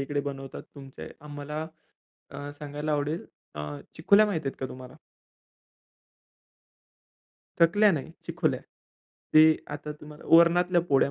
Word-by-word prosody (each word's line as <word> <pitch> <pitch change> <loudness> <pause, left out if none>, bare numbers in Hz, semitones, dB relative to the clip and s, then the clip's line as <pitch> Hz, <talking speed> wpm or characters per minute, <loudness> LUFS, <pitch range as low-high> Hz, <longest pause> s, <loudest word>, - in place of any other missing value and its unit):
इकडे 145 +1 -1
बनवतात. 135 -1 -6
तुमचे 135 -2 -10
आम्हाला 150 +1 -6 0.7
अ, 145 +1 -7
सांगायला 150 +1 -5
आवडेल, 150 +2 -1 0.3
अ, - - -6 0.4
चिकोल्या 200 +6 +5
माहिती 165 -9 -2
आहेत 135 - -4
का 130 - -2
तुम्हाला? 130 0 -11 2.6
चकल्या 205 +6 +5
नाही 145 -4 -3 0.2
चिकोल्या. - - -1 0.7
ते 155 0 +7
आता 145 +1 -6
तुम्हाला 150 0 -12
वरणातल्या 175 +1 +4
पोळ्या 140 -4 +2
150 Hz, 115 wpm, -27 LUFS, 140-165 Hz, 2.6 s, ते